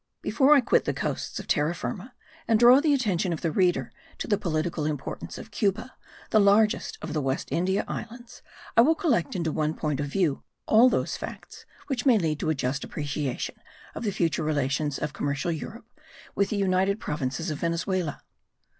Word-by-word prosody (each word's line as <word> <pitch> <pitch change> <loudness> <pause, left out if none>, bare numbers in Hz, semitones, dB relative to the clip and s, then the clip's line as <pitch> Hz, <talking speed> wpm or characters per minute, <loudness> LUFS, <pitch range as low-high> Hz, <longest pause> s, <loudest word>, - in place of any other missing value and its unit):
Before 290 +1 +5
I 280 - +5
quit - - +2
the - - -1
coasts - - -3
of - - -7
Terra 150 +3 +1
Firma 210 +8 -6 0.3
and 225 -2 +3
draw 245 +3 +8
the 300 +1 +2
attention 200 -10 +1
of 160 - -5
the 165 - 0
reader 180 +1 +1 0.3
to - - -4
the 210 - +3
political 165 -4 -2
importance 145 -3 -5
of 220 - -10
Cuba, 210 +3 -1 0.4
the 215 - +5
largest 210 +1 +3
of - - -4
the 155 - 0
West 135 0 -2
India 190 +3 0
Islands, 235 +1 -8 0.3
I 230 - +8
will 315 +7 +4
collect 250 - 0
into 165 -3 -1
one 155 +1 -1
point 150 -3 -2
of 145 - -1
view 155 -2 0 0.2
all 230 +4 +6
those - - -1
facts - - -9 0.2
which 265 -4 -2
may 245 -4 +6
lead 155 -6 -1
to - - -1
a 155 - +1
just 135 +1 -2
appreciation 145 -3 -4 0.4
of - - -6
the 210 - 0
future 170 -4 0
relations 145 -1 0
of 150 -1 -4
commercial 145 +4 -2
Europe 210 +9 -6 0.5
with 200 0 +1
the 210 - -1
united 195 +1 +1
Provinces 150 -1 -3
of 150 - -4
Venezuela. 170 -1 -2
175 Hz, 190 wpm, -26 LUFS, 150-220 Hz, 0.5 s, draw